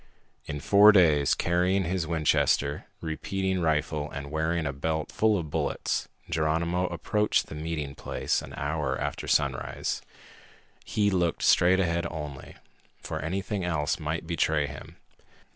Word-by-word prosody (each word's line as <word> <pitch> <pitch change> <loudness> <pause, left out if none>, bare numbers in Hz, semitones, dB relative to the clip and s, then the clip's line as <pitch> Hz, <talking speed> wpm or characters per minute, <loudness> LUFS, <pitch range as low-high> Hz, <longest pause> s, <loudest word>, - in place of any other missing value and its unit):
In 75 - -4
four 100 +7 +7
days, 80 -8 +4
carrying 90 +3 +1
his 90 -1 -2
Winchester 75 -3 +1
repeating 95 +3 -2
rifle 75 -2 0
and 70 0 -7
wearing 80 +1 0
a 70 - -2
belt 80 +3 -2
full 110 -1 +2
of 80 -5 -5
bullets, - - -1 0.2
Geronimo 85 +3 0
approached 105 +6 0
the - - -10
meeting 75 -2 -4
place - - -2
an - - -9
hour 75 -2 -1
after - - -3
sunrise. - - 0 0.8
He 105 -1 +1
looked 85 -3 0
straight 90 +2 +5
ahead 85 -2 0
only, 75 -4 -7 0.4
for - - -5
anything 95 - -3
else 80 -4 -1
might 80 +1 -3
betray 80 -3 +1
him. 70 +1 -9
80 Hz, 135 wpm, -27 LUFS, 75-90 Hz, 0.8 s, four